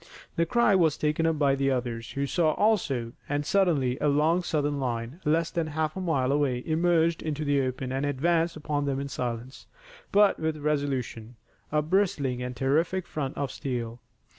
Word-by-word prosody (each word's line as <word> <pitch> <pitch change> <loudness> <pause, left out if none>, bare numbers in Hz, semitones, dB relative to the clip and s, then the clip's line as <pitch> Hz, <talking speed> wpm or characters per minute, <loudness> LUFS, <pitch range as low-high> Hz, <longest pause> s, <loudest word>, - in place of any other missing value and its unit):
The 165 0 +1
cry 235 +1 +3
was 165 -6 +3
taken 155 +2 +1
up 165 -1 +1
by 140 -2 +3 0.2
others 120 -3 -3
who 140 0 -1
saw 155 +2 +2
also, 140 - +1 0.2
and 145 +1 -1
suddenly 150 -10 +2
a - - +2
long 155 +5 +3
Southern 145 -4 -1
line, 125 +4 -3
less 165 +2 +2
than 165 -2 -1
half 155 0 -2
a 190 - -4
mile 140 -7 +1
away, 135 -4 +1
emerged 165 0 +2
into 155 -1 -3
the 145 -1 +2
open 130 0 -3
and 135 +1 -1
advanced 165 +4 +1
upon 150 -2 -2
them 135 -1 -1
in 140 0 -4
silence, 125 0 -5 0.4
but 205 0 +4
with 160 -1 -1
resolution, 140 -6 -2 0.4
a 150 0 +2
bristling 150 -8 0
and 125 0 -4
terrific 160 +8 +1
front 140 -4 -4
of 140 -2 -2
steel. 120 -3 -4
145 Hz, 175 wpm, -27 LUFS, 130-165 Hz, 0.4 s, but